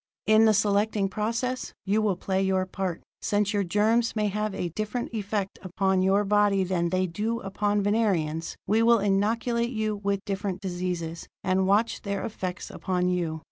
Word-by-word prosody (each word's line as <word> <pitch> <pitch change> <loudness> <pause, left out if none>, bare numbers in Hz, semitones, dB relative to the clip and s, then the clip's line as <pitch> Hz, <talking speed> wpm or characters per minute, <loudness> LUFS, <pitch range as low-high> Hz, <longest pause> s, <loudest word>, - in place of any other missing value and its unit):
"In 215 +1 +6
the 220 - +5
selecting 205 0 +2
process, 230 +5 -2
you 205 +3 +2
will 210 -3 +1
play 190 +1 -1
your 190 -1 +1
part. 185 -2 -4 0.2
Since 205 0 +1
our 205 -1 +1
germs 220 +6 +2
may 210 -1 +1
have 210 0 -2
a 175 - -2
different 215 +7 -4
effect 205 -2 -3
upon 190 0 0
your 195 +2 +3
bodies 200 -2 +2
than 175 -2 +1
they 185 +1 +1
do 215 +7 -2
upon 205 +1 0
Venerians, 185 -7 0
we 215 +4 +2
will 235 +1 +6
inoculate 225 +4 +1
you 215 -3 -1
with 200 -1 -2
different 195 -1 -3
diseases, 175 -3 -4 0.2
and 190 0 +2
watch 210 +4 +2
their 200 -1 -3
effects 185 -3 -5
upon 180 -1 -1
you. 170 -3 -1
200 Hz, 170 wpm, -27 LUFS, 185-215 Hz, 0.2 s, In